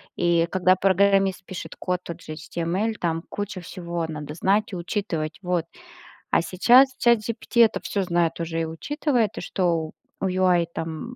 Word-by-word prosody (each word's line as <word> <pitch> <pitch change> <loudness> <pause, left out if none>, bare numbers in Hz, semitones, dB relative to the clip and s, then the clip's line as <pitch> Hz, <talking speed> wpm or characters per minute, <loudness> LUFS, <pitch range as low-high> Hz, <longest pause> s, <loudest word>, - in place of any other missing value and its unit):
И 170 -1 +2
когда 185 0 +4
программист 195 0 +2
пишет 185 - -7
код 180 -1 -2
тот 170 0 -8
же 155 - -7
HTML, 175 +7 -2
там 165 -1 -1
куча 200 -2 -5
всего 170 -1 -4
надо 150 -1 -6
знать 200 +5 +1
и - - -2
учитывать, 170 -4 -3
вот. 175 -2 -1 0.7
А - - +4
сейчас 245 +10 +5
Chat 235 -1 +6
GPT 230 +2 0
это - - -2
всё 200 -2 -1
знает 170 -2 0
уже 165 0 -2
и - - 0
учитывает, 235 - -1
и - - -3
что 170 -4 -1 0.3
у - - 0
UI, 180 -2 +3
там, 165 +10 -5
180 Hz, 165 wpm, -24 LUFS, 165-200 Hz, 0.7 s, Chat